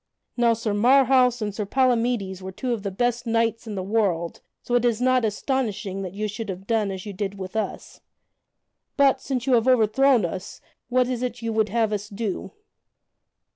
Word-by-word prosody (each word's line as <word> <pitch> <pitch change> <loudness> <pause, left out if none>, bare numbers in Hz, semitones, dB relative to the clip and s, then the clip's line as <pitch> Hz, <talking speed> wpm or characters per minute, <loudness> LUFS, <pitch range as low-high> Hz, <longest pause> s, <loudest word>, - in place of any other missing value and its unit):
Now 235 -1 +3
Sir 225 -2 -2
Marhaus 250 +1 +4
and 210 -1 -3
Sir 210 - -3
Palamydes 235 -6 +1
were 190 0 -6
two 245 +6 -2
of 225 - -3
the 200 - -3
best 240 +4 -1
knights 230 0 0
in 210 - -5
the 190 - -3
world, 190 -5 -1 0.2
so 245 - -4
it 245 -1 +3
is 235 -2 +1
not 255 0 +3
astonishing 210 -3 -2
that 190 -1 -6
you 215 +1 -2
should 215 +1 -6
have 190 0 -6
done 220 -2 +1
as 190 0 -6
you 205 - -6
did 200 +1 -4
with 190 +1 -7
us. 220 - -4 1.0
But, 280 -2 +4
since 255 -3 -3
you 265 - +2
have 235 0 +3
overthrown 255 -1 +4
us, 185 +2 -6 0.3
what 250 0 +2
is 250 -2 -2
it 245 -2 -4
you 225 -1 -2
would 220 -1 +1
have 220 0 +1
us 210 0 -4
do?" 205 -2 -4
225 Hz, 195 wpm, -24 LUFS, 200-245 Hz, 1.0 s, Marhaus